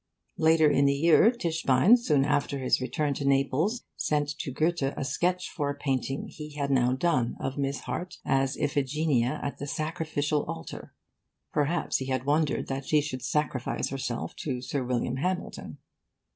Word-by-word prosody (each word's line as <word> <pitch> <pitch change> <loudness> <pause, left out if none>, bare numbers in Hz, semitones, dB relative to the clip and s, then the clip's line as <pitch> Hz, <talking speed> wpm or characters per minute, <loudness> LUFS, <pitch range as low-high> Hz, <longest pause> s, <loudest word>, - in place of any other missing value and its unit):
Later 160 0 +5
in 140 -1 +3
the 140 0 +3
year, 165 +8 +5
Tischbein, 165 - +3
soon 150 - +2
after 145 -1 0
his 130 -1 +1
return 140 +3 -1
to 140 - -4
Naples, 140 - +1
sent 150 -1 0
to - - -3
Goethe 160 +5 0 0.2
a - - -2
sketch 180 +6 0
for 145 -4 -2
a 145 - -2
painting 135 -1 -2
he 150 -1 -9
had 140 -1 -1
now 125 -2 +3
done 130 -4 0
of 135 +1 -3
Miss 140 0 -1
Harte 180 +1 -5
as 135 0 +1
Iphigenia 145 -2 0
at 140 - -4
the 145 - -5
Sacrificial 155 -1 -1
Altar. 80 - -7 0.6
Perhaps 155 +3 +1
he 130 - -5
had 130 -1 -1
wondered 150 +1 +1
that 135 0 -4
she 155 - +4
should 145 -3 -4
sacrifice 145 -4 -1
herself 130 -3 -4
to 130 -5 -3
Sir 130 +2 -3
William 125 0 -1
Hamilton.... 180 +6 -3
145 Hz, 165 wpm, -28 LUFS, 135-155 Hz, 0.6 s, Later